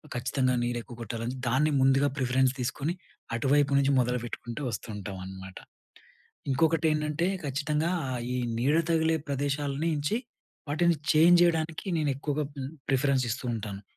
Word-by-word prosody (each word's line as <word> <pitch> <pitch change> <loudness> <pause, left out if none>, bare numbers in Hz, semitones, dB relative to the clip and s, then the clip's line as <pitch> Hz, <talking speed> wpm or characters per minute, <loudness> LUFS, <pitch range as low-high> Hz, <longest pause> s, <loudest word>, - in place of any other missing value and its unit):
ఖచ్చితంగా 130 +1 0
నీరు 120 0 -1
ఎక్కువ 120 - -11
కొట్టాలని 115 +3 -4
దాన్ని 145 +6 +2
ముందుగా 135 +2 +4
ప్రిఫరెన్స్ 130 0 +2
తీసుకొని 140 +6 -2 0.4
అటువైపు 140 +4 +2
నుంచి 140 0 +3
మొదలుపెట్టుకుంటూ 120 +1 -3
వస్తూ 110 - -5
ఉంటావనమాట. 95 -1 -7 0.9
ఇంకొకటి 160 +3 +2
ఏంటంటే 150 +2 0 0.2
ఖచ్చితంగా 150 +3 0 0.2
ఆహ్, 125 -2 -3
ఈ - - -1 0.2
నీడ 140 +5 +2
తగిలే 160 -1 +3
ప్రదేశాలనించి 145 - -1 0.5
వాటిని 170 +3 +3 0.2
చేంజ్ 170 +3 +6
జేయడానికి 165 -1 0
నేను 150 -2 +1
ఎక్కువగా 145 +2 -2 0.2
మ్ 130 - -4 0.2
ప్రిఫరెన్స్ 135 -1 +2
ఇస్తూ 130 +1 -4
ఉంటాను. 105 -3 -5
140 Hz, 130 wpm, -28 LUFS, 125-150 Hz, 0.9 s, చేంజ్